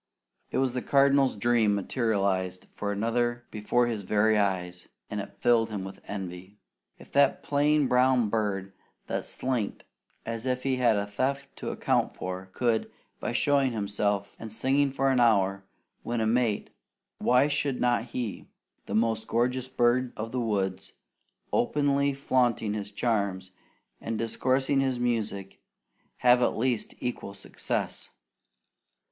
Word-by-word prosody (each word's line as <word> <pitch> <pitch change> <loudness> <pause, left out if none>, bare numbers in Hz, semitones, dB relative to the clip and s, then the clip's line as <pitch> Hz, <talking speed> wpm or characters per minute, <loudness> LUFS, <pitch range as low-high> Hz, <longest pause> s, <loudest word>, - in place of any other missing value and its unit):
It - - -2
was 130 -2 +1
the 125 - -2
Cardinal's 140 -1 +4
dream 110 -1 +2
materialized 100 -4 -1
for 100 -1 -3
another 120 +3 0
before 110 +3 +1
his 115 -3 -2
very 105 +2 +2
eyes, 90 -3 -1 0.2
and 105 -1 -2
it 100 - -11
filled 120 -2 +3
him 105 -3 -4
with 95 0 -9
envy. 95 0 -7 0.4
If - - -16
that 140 -1 +3
plain 145 0 +2
brown 125 -2 +3
bird 100 -3 -1 0.3
that - - -3
slinked 125 -6 -2 0.4
as 115 +2 -4
if 125 0 -1
he 135 -1 +1
had 120 -4 +3
a 100 - 0
theft 130 +7 -2
to - - -4
account - - 0
for, 95 +1 -5
could, 115 -1 0 0.3
by - - -2
showing 140 -3 +2
himself 100 -1 -1
and 110 -1 -7
singing 135 +5 +2
for 135 0 +1
an 130 - +2
hour, 100 -4 +3 0.4
win 120 0 -2
a 110 - +1
mate, 115 -2 +1 0.5
why 125 +3 +4
should 145 -2 -1
not 120 -1 +2
he, 120 -3 -5 0.4
the - - -3
most 110 0 +1
gorgeous 125 +2 0
bird 125 0 +1
of 115 +1 -4
the 125 - -1
woods, 95 -4 -2 0.6
openly 140 +2 +2
flaunting 120 -6 +1
his 105 -1 -4
charms 100 -4 -1 0.5
and 115 0 -3
discoursing 130 +4 +1
his 130 -2 0
music, 110 -5 -2 0.6
have 125 0 +5
at - - +1
least 120 -1 -1
equal 120 -5 -4
success? - - -4
115 Hz, 145 wpm, -28 LUFS, 100-130 Hz, 0.6 s, have